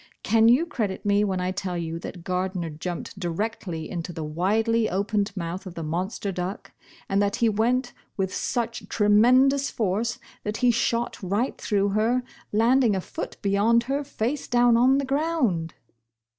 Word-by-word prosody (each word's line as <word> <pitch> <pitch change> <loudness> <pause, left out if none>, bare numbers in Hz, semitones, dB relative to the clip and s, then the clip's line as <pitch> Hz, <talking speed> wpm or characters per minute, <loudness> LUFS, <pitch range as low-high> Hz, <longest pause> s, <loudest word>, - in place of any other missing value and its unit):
Can 225 0 +4
you 260 +8 +5
credit 210 - -3
me, 205 0 +3
when 190 -3 0
I 180 0 -1
tell 185 -2 -3
you 165 -1 -4
that 175 0 -8
Gardner 180 -2 -2
jumped 175 +5 -6
directly 175 -2 -3
into 175 -1 -5
the 165 -2 -5
widely 215 +8 +1
opened 200 +2 0
mouth 180 +2 -4
of 180 - -9
the 165 - -5
monster 185 +6 -2
duck, 180 +2 -5 0.4
and 195 +1 +1
that 200 0 +1
he 235 - +2
went 245 +4 +1 0.2
with 190 -1 -1
such 235 -1 -2
tre 210 -2 +1
mendotis 255 +6 +5
force 225 +3 -1 0.3
that 210 +1 -3
he 245 - +6
shot 235 +1 -1
right 205 +7 -1
through 200 -2 0
her, 225 +5 +1 0.3
land 235 +5 +4
ing 220 -5 +3
a - - 0
foot - - -6
beyond 210 +4 +3
her, 275 +4 -1
face 275 0 -3
down, 240 -1 +4
on 255 +3 +5
the 280 - 0
ground 270 - 0
210 Hz, 170 wpm, -25 LUFS, 185-235 Hz, 0.4 s, he